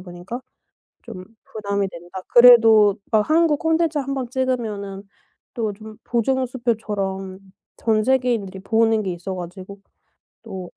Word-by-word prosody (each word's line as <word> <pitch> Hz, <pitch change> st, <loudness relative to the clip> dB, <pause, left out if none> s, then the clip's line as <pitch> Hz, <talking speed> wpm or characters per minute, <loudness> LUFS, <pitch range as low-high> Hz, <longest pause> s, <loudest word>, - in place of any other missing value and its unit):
보니까 180 Hz, +7 st, -8 dB, 0.6 s
좀 185 Hz, 0 st, -9 dB, 0.2 s
부담이 200 Hz, -2 st, -3 dB
된다. 175 Hz, +1 st, -10 dB
그래도 225 Hz, -4 st, +7 dB
막 215 Hz, +1 st, +2 dB
한국 315 Hz, -2 st, +3 dB
콘텐츠 320 Hz, -1 st, +1 dB
1 275 Hz, -1 st, -3 dB
번 255 Hz, -3 st, -4 dB
찍으면은 220 Hz, -7 st, -3 dB, 0.5 s
또 220 Hz, -3 st, -2 dB
좀 215 Hz, +1 st, -12 dB
보증수표처럼 225 Hz, -6 st, -2 dB, 0.4 s
전 215 Hz, -2 st, +1 dB
세계인들이 240 Hz, -7 st, 0 dB
보는 225 Hz, +1 st, +2 dB
게 185 Hz, -2 st, -3 dB
있어 180 Hz, +2 st, -6 dB
가지고 185 Hz, +3 st, -9 dB, 0.6 s
또 185 Hz, -2 st, -8 dB
215 Hz, 255 characters per minute, -21 LUFS, 195-245 Hz, 0.6 s, 그래도